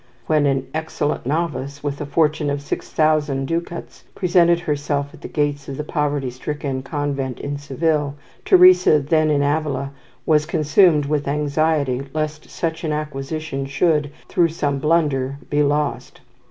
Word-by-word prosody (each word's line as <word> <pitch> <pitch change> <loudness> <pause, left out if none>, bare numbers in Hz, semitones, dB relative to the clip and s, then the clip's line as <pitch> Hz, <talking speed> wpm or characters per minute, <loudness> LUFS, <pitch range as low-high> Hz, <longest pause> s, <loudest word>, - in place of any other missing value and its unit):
When 150 -2 +2
an 135 -1 0
"excellent 155 -4 -2
novice" 140 -3 -2
with 145 0 -3
a 150 - -4
fortune 150 0 +1
of 140 0 -1
six 145 - -5
thousand 150 -3 +1
ducats 170 +3 -5
presented 175 -2 +3
herself 145 -2 -2
at - - -14
the - - -6
gates 145 -2 -2
of 135 - -5
the 150 - -3
poverty 145 -4 -1
stricken 135 +1 -4
convent 140 -2 -3
in 145 0 -4
Seville, 145 0 -1 0.3
Teresa, 180 -3 +6
then 155 +2 +2
in 145 -1 +2
Avila, 140 -2 -1 0.3
was 150 -1 +3
consumed 155 0 +3
with 145 0 -1
anxiety 145 -2 0
lest 155 0 -3
such 165 0 -3
an 155 - -1
acquisition 150 -1 -4
should, 150 +1 +1 0.2
through 170 -1 +2
some 145 -4 -1
blunder, 140 -3 +1
be 145 0 +2
lost. 145 -4 -1
150 Hz, 150 wpm, -21 LUFS, 140-155 Hz, 0.3 s, Teresa